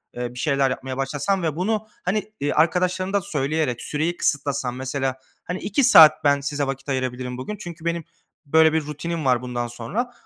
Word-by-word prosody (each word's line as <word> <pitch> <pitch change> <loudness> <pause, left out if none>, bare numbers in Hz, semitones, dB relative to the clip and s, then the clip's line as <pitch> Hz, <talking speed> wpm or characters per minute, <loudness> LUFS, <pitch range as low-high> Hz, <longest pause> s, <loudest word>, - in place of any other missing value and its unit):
eee, 120 0 -4
bir 125 - -9
şeyler 140 -2 +2
yapmaya 130 0 -4
başlasan 145 +7 -1
ve 155 -2 -1
bunu, 215 +4 -1 0.2
hani, 210 +3 -1 0.2
arkadaşlarına 180 +4 +1
da 200 - +2
söyleyerek 150 -5 -1
süreyi 160 +4 -1
kısıtlasan 140 -5 0
mesela. 130 0 -2 0.3
Hani 180 +2 -4
2 280 +7 0
saat 160 -14 +8
ben 145 -1 +4
size 145 0 -2
vakit 135 +1 -5
ayırabilirim 130 -1 -3
bugün. 210 +12 -5
Çünkü 170 -4 -9
benim 170 0 -1 0.4
böyle 160 +2 +5
bir 160 -2 0
rutinim 155 +1 -4
var. 125 -2 +3
Bundan 120 -1 -3
sonra 180 - -4
150 Hz, 175 wpm, -23 LUFS, 130-175 Hz, 0.4 s, saat